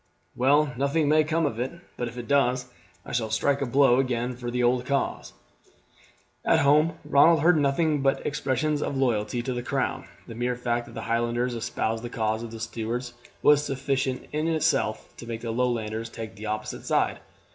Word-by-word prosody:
"Well, 140 Hz, +2 st, +3 dB
nothing 140 Hz, +3 st, +1 dB
may 155 Hz, +1 st, +5 dB
come 160 Hz, +1 st, 0 dB
of 115 Hz, -6 st, -2 dB
it; 130 Hz, +5 st, -2 dB, 0.2 s
but 120 Hz, -, -3 dB
if 120 Hz, +1 st, -9 dB
it 120 Hz, -, -6 dB
does 130 Hz, -3 st, +2 dB, 0.4 s
I -, -, -8 dB
shall 115 Hz, -3 st, -1 dB
strike 140 Hz, +6 st, +1 dB
a 140 Hz, -, 0 dB
blow 130 Hz, 0 st, +4 dB
again 125 Hz, -1 st, -1 dB
for 120 Hz, 0 st, -5 dB
the 125 Hz, +1 st, -1 dB
old 125 Hz, +1 st, +2 dB
cause." 140 Hz, -, -1 dB, 1.1 s
At -, -, +3 dB
home 150 Hz, +3 st, +4 dB
Ronald 160 Hz, +2 st, +5 dB
heard 170 Hz, +1 st, +5 dB
nothing 145 Hz, +1 st, +1 dB
but 135 Hz, 0 st, +1 dB
expressions 145 Hz, +1 st, 0 dB
of 140 Hz, -, -2 dB
loyalty 120 Hz, -2 st, 0 dB
to 130 Hz, -, -2 dB
the 120 Hz, -, -3 dB
crown. -, -, -2 dB, 0.2 s
The -, -, -9 dB
mere 120 Hz, +2 st, -1 dB
fact 120 Hz, -1 st, -2 dB
that -, -, -12 dB
the 115 Hz, -, -4 dB
Highlanders 120 Hz, +2 st, 0 dB
espoused 115 Hz, -1 st, -2 dB
the 120 Hz, -, -6 dB
cause 110 Hz, -1 st, -1 dB
of 115 Hz, -, -6 dB
the 115 Hz, 0 st, -9 dB
Stuarts 120 Hz, +2 st, -4 dB, 0.3 s
was 150 Hz, 0 st, +6 dB
sufficient 135 Hz, -1 st, -2 dB
in 155 Hz, +2 st, -1 dB
itself 155 Hz, -9 st, 0 dB
to 120 Hz, -, -10 dB
make 115 Hz, -1 st, -5 dB
the 115 Hz, -, -3 dB
Lowlanders 115 Hz, -2 st, -1 dB
take 115 Hz, -1 st, -7 dB
the 105 Hz, +2 st, -7 dB
opposite 110 Hz, 0 st, -4 dB
side. -, -, +1 dB
125 Hz, 190 wpm, -26 LUFS, 115-140 Hz, 1.1 s, was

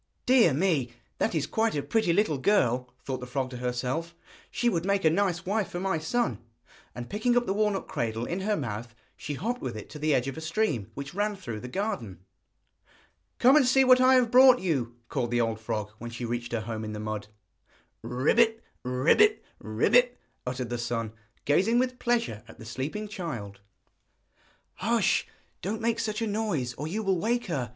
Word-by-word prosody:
'Dear 245 Hz, -9 st, +5 dB
me! 140 Hz, -5 st, +1 dB, 0.3 s
that -, -, 0 dB
is 155 Hz, -, +1 dB
quite 225 Hz, -3 st, 0 dB
a 145 Hz, -, -1 dB
pretty 220 Hz, -6 st, +1 dB
little 165 Hz, -6 st, +2 dB
girl,' 125 Hz, -, +2 dB
thought 130 Hz, -2 st, -3 dB
the 125 Hz, -, -7 dB
frog 130 Hz, 0 st, -2 dB
to 125 Hz, -, -6 dB
herself; 125 Hz, +7 st, -3 dB, 0.3 s
'she 240 Hz, -, -1 dB
would 170 Hz, -8 st, +1 dB
make 200 Hz, -1 st, +1 dB
a 160 Hz, -, +6 dB
nice 180 Hz, -1 st, 0 dB
wife 205 Hz, +1 st, 0 dB
for 175 Hz, -, -4 dB
my 190 Hz, -3 st, 0 dB
son.' 235 Hz, +10 st, -1 dB, 0.6 s
And 120 Hz, 0 st, -6 dB
picking 240 Hz, +4 st, +1 dB
up 245 Hz, -, +2 dB
the 195 Hz, -, 0 dB
walnut 210 Hz, -1 st, 0 dB
cradle 115 Hz, 0 st, -2 dB
in 175 Hz, +7 st, -3 dB
her 205 Hz, +2 st, 0 dB
mouth, 115 Hz, -3 st, -5 dB, 0.2 s
she 145 Hz, -, -5 dB
hopped 240 Hz, -, -3 dB
with 120 Hz, -4 st, -4 dB
it 105 Hz, -, -9 dB
to 150 Hz, -, -8 dB
the 155 Hz, 0 st, +2 dB
edge 125 Hz, +1 st, 0 dB
of 135 Hz, -, -4 dB
a -, -, -5 dB
stream 160 Hz, -, -1 dB
which 140 Hz, +2 st, -6 dB
ran 205 Hz, +2 st, 0 dB
through 120 Hz, -, -6 dB
the 125 Hz, -, -7 dB
garden. 190 Hz, -, -3 dB, 1.2 s
'Come 260 Hz, +3 st, +6 dB
and 290 Hz, -4 st, +5 dB
see 265 Hz, +1 st, +5 dB
what 255 Hz, -1 st, +6 dB
I 260 Hz, +1 st, +6 dB
have 245 Hz, -3 st, +3 dB
brought 255 Hz, 0 st, +8 dB
you,' 135 Hz, -, -1 dB
called 125 Hz, -4 st, -2 dB
the 120 Hz, 0 st, +1 dB
old 115 Hz, -1 st, -1 dB
frog, 110 Hz, -2 st, -3 dB
when 120 Hz, -, -6 dB
she 115 Hz, +1 st, -5 dB
reached 120 Hz, 0 st, -3 dB
her 115 Hz, -2 st, -1 dB
home 110 Hz, 0 st, -5 dB
in 110 Hz, 0 st, -5 dB
the 105 Hz, -, -5 dB
mud. 105 Hz, -1 st, -4 dB, 0.8 s
'Croak! 125 Hz, -, +1 dB, 0.4 s
croak! 145 Hz, -, +3 dB, 0.2 s
croak!' 245 Hz, -, +3 dB, 0.3 s
uttered 125 Hz, -1 st, -3 dB
the 120 Hz, -, -2 dB
son, 115 Hz, -2 st, -3 dB, 0.3 s
gazing 190 Hz, +11 st, +3 dB
with 255 Hz, 0 st, 0 dB
pleasure 230 Hz, -, 0 dB
at 115 Hz, -, -14 dB
the 110 Hz, -, -11 dB
sleeping 140 Hz, -, -4 dB
child. 135 Hz, -, -6 dB, 1.2 s
'Hush; 225 Hz, 0 st, +1 dB, 0.3 s
don't 215 Hz, +4 st, -3 dB
make 230 Hz, 0 st, 0 dB
such 215 Hz, +1 st, -2 dB
a -, -, +1 dB
noise 205 Hz, -, -1 dB
or 145 Hz, +5 st, -5 dB
you 210 Hz, +7 st, -3 dB
will 190 Hz, -3 st, +1 dB
wake 240 Hz, +5 st, 0 dB
her!' 135 Hz, -, -2 dB
160 Hz, 195 wpm, -28 LUFS, -, 1.2 s, brought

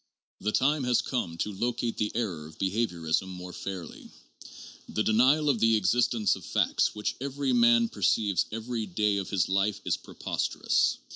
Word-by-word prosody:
The 105 Hz, -, -1 dB
time 145 Hz, +5 st, +2 dB
has 125 Hz, -1 st, +3 dB
come 85 Hz, -11 st, -3 dB
to 105 Hz, -, -2 dB
locate 120 Hz, +3 st, -2 dB
the 105 Hz, -, -1 dB
error 90 Hz, -10 st, -3 dB
of 80 Hz, -, -15 dB
behaviorism 95 Hz, -4 st, -1 dB
more 90 Hz, -1 st, -8 dB
fairly. 95 Hz, -4 st, -7 dB, 0.8 s
The 110 Hz, -, 0 dB
denial 130 Hz, +8 st, +3 dB
of 135 Hz, -6 st, +2 dB
the 115 Hz, 0 st, +4 dB
existence 110 Hz, +1 st, +2 dB
of -, -, -11 dB
facts -, -, +1 dB
which 105 Hz, -, -2 dB
every 140 Hz, -1 st, -1 dB
man 120 Hz, -1 st, +5 dB
perceives 100 Hz, -2 st, +1 dB
every 115 Hz, 0 st, -4 dB
day 105 Hz, +2 st, +1 dB
of 95 Hz, -, -3 dB
his 95 Hz, -5 st, +1 dB
life 100 Hz, +2 st, 0 dB
is -, -, +1 dB
preposterous. -, -, -1 dB
110 Hz, 160 wpm, -28 LUFS, 95-120 Hz, 0.8 s, man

